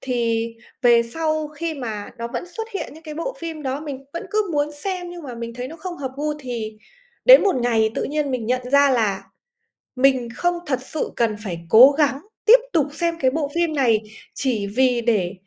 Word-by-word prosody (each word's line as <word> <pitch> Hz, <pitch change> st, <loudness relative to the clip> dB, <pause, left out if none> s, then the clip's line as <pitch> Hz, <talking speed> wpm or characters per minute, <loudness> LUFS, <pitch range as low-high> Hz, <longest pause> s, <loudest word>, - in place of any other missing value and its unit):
Thì 230 Hz, -2 st, 0 dB, 0.3 s
về 235 Hz, -1 st, +6 dB
sau 310 Hz, -2 st, -1 dB
khi 320 Hz, +1 st, -4 dB
mà 220 Hz, -6 st, -5 dB
nó 235 Hz, 0 st, -4 dB
vẫn -, -, -3 dB
xuất 445 Hz, +5 st, -6 dB
hiện 390 Hz, -, -5 dB
những 320 Hz, -, -14 dB
cái 305 Hz, -2 st, -8 dB
bộ 415 Hz, +11 st, -4 dB
phim 325 Hz, -2 st, -6 dB
đó, 270 Hz, +2 st, -2 dB
mình 275 Hz, -3 st, -7 dB
vẫn 340 Hz, +4 st, -5 dB
cứ 425 Hz, -3 st, 0 dB
muốn 295 Hz, 0 st, 0 dB
xem, 355 Hz, +3 st, -4 dB
nhưng 350 Hz, -2 st, -9 dB
mà 250 Hz, -, -7 dB
mình 235 Hz, 0 st, -6 dB
thấy 250 Hz, +1 st, -5 dB
nó 325 Hz, -, -9 dB
không 350 Hz, +1 st, -6 dB
hợp 265 Hz, -2 st, -4 dB
gu 300 Hz, +1 st, -1 dB
thì 230 Hz, -5 st, -5 dB, 0.5 s
đến -, -, +9 dB
một 390 Hz, -9 st, +2 dB
ngày 225 Hz, -3 st, +2 dB
tự -, -, 0 dB
nhiên 295 Hz, -1 st, -1 dB
mình 250 Hz, -4 st, -2 dB
nhận 250 Hz, +1 st, -1 dB
ra 280 Hz, -1 st, +6 dB
là 215 Hz, -6 st, +1 dB, 0.7 s
mình 255 Hz, -2 st, +3 dB
không 350 Hz, 0 st, +1 dB
thật 260 Hz, -3 st, -1 dB
sự 300 Hz, +3 st, -4 dB
cần 225 Hz, -3 st, +1 dB
phải 170 Hz, -4 st, -4 dB
cố 255 Hz, +6 st, +9 dB
gắng 285 Hz, -2 st, +1 dB, 0.3 s
tiếp 475 Hz, +2 st, +8 dB
tục 310 Hz, -5 st, +3 dB
xem 335 Hz, +2 st, -1 dB
cái 260 Hz, -, +3 dB
bộ 290 Hz, 0 st, -2 dB
phim 340 Hz, -2 st, +1 dB
này 235 Hz, -6 st, +3 dB, 0.3 s
chỉ 235 Hz, -7 st, -1 dB
vì 255 Hz, -2 st, +3 dB
để 205 Hz, -7 st, +1 dB
275 Hz, 215 wpm, -22 LUFS, 235-320 Hz, 0.7 s, đến